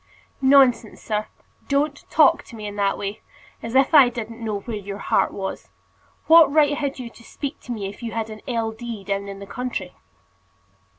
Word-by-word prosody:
"Nonsense, 265 -4 +4
sir. 215 -1 -2 0.4
Don't 285 +1 -1
talk 305 -3 +5
to - - -12
me 215 -1 -8
in 205 0 -6
that 200 -1 +1
way. 200 +2 -5 0.4
As 230 +2 -6
if 270 +4 +4
I 280 -5 +8
didn't 230 -1 -7
know 210 -2 -2
where 230 +2 -5
your 200 -1 -6
heart - - +1
was. 190 -1 -6 0.6
What 325 -3 +7
right 295 -1 +4
had 280 -1 -3
you 245 -3 -7
to 230 - -17
speak 280 +4 -6
to - - -9
me 210 -4 -3
if 200 +4 -10
you 230 -1 -4
had 225 -1 -3
an 215 - -9
L. 230 -3 -1
D. 225 -2 -7
down 200 0 -3
in 195 0 -7
the 200 - -9
country?" 250 +4 -5
230 Hz, 195 wpm, -23 LUFS, 205-270 Hz, 0.6 s, I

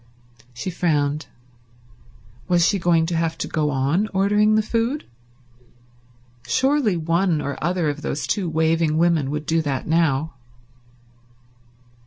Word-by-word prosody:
She 125 +10 -5
frowned. 150 -4 0 1.2
Was 175 -1 +3
she 200 - +1
going 170 -2 +2
to 170 +1 -2
have 165 0 -1
to - - -4
go 155 -2 -1
on 145 +9 0
ordering 210 +2 +3
the 215 - +2
food? 230 +6 -1 1.4
Surely 265 -8 +2
one 165 +1 +1
or 140 -1 -3
other 175 -1 0
of 145 0 -3
those 145 -2 -3
two 180 +5 -1
waving 160 0 +1
women 165 -4 +2
would 150 +1 -4
do 165 0 +1
that 140 -4 -3
now. 160 -2 +1
165 Hz, 130 wpm, -22 LUFS, 150-185 Hz, 1.4 s, Was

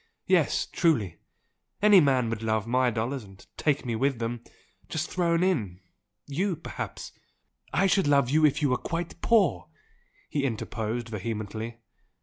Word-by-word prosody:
Yes, - - +2
truly! 115 - +1 0.6
Any 205 -1 +7
man 130 -5 +2
would 115 -1 -3
love 110 -1 0
my 125 +2 +2
dollars, 120 +3 -2
and 95 -1 -16
take 145 -3 0
me 120 -2 -1
with 135 +2 +1
them, 115 +1 -4 0.5
just 160 +1 -3
thrown 170 -1 +1
in! 110 - 0 0.5
You, 175 +6 -1
perhaps 160 - -7 0.3
" - - -52 0.3
"I 175 +8 +2
should 195 -3 +3
love 140 -3 +4
you 155 +5 +2
if 150 0 +3
you 140 - +3
were 125 - +2
quite 170 +4 -5
poor!" 185 - +3 0.6
he 145 - -2
interposed 115 -1 -3
vehemently. 110 +1 -5
130 Hz, 150 wpm, -27 LUFS, 110-160 Hz, 0.6 s, Any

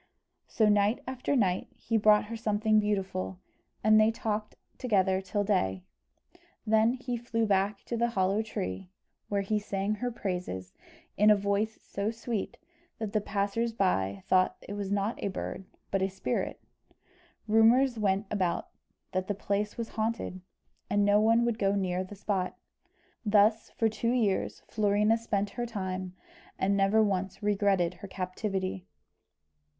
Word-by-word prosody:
So 220 - +2
night 210 +2 +3
after 260 +2 -2
night 190 -7 +1
he 230 - -3
brought 210 -1 +5
her 230 +2 -6
something 215 0 +2
beautiful, 195 -3 -2 0.5
and 215 +1 +6
they 215 - +5
talked 215 -1 -3 0.2
together 190 -5 +2
till 205 +2 -1
day, 95 - 0 0.8
when 220 +2 +4
he 255 -1 -4
flew 230 -1 -1
back 200 0 +1
to 235 - -4
the 235 +1 +1
hollow 195 -1 +1
tree, 95 - -5 0.4
where 200 -1 0
he 210 +2 0
sang 200 0 -2
her 245 +4 -2
praises 180 - -4 0.4
in 210 +1 +6
a 210 - +8
voice 200 +2 0
so 200 +2 -2
sweet 230 -2 -4 0.4
that 220 -2 -4
the 215 - +2
passers 205 +3 -1
by 100 - 0
thought 185 0 +3
it 200 - -5
was 200 -1 -4
not 200 +2 -1
a - - +1
bird 190 0 -5 0.3
but 195 - +1
a 190 - +1
spirit. 190 0 -3 0.9
Rumours 230 +3 +4
went 200 0 +1
about 185 -5 -1 0.4
that 185 0 -1
the 205 - -1
place 205 +1 -2
was 230 -1 -4
haunted, 220 -4 -3 0.5
and 205 0 +3
no 205 +1 +5
one 230 +2 +4
would 235 -1 -1
go 195 0 +2
near 185 -2 0
the 190 +2 -10
spot. 190 -2 -2 0.7
Thus, 215 +1 +3
for 225 - +1
two 230 +2 -1
years, 215 -6 0
Florina 210 +1 +2
spent 205 -3 -1
her 240 -1 -3
time, 185 -4 -4 0.4
and 195 +1 +1
never 200 +3 +4
once 195 -1 -2
regretted 195 -4 +2
her 200 - -6
captivity. 190 0 -3
205 Hz, 155 wpm, -29 LUFS, 190-220 Hz, 0.9 s, a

